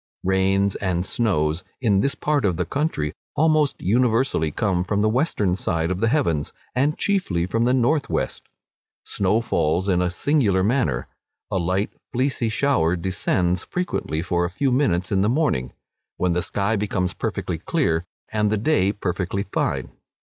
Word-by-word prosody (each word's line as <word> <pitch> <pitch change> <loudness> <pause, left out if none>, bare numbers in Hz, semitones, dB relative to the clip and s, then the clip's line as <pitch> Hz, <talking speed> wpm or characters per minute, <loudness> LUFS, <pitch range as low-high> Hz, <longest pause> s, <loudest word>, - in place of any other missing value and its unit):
Rains 95 +1 +2
and 90 -2 -1
snows, 80 -8 0 0.2
in 105 -7 +2
this 140 +7 +1
part 150 -2 0
of 90 -5 +1
the 90 - 0
country 90 - -1 0.2
almost 155 -1 +2
universally 115 - +2
come 90 +3 0
from 100 +2 0
the 110 - +3
western 110 - +1
side 85 -2 -1
of 95 - -2
the 115 - +2
heavens, 100 - +1 0.2
and 145 +4 +1
chiefly 180 - 0
from 115 +5 0
the 125 - +3
north 135 +4 +1
west. - - -2 0.6
Snow 100 +4 +1
falls 85 -4 0
here 100 - +2
in 90 - +2
a 90 - +1
singular 100 - +2
manner. 95 - +1 0.5
A 95 - +1
light 95 +4 0 0.2
fleecy 130 -2 0
shower 100 -8 +2
descends 90 0 0
frequently 175 - -2
for 85 -1 0
a 85 - -1
few 130 +9 0
minutes 95 -10 +1
in 95 -1 +2
the 105 - +2
morning, 120 - 0 0.5
when 90 -1 +1
the 90 - +1
sky 100 +3 0
becomes 95 -3 -1
perfectly - - -3
clear, 80 0 0 0.3
and 105 -1 +1
the 110 - +1
day 100 -4 +2
perfectly 95 0 -2
fine. 100 - -2
100 Hz, 165 wpm, -23 LUFS, 90-125 Hz, 0.6 s, the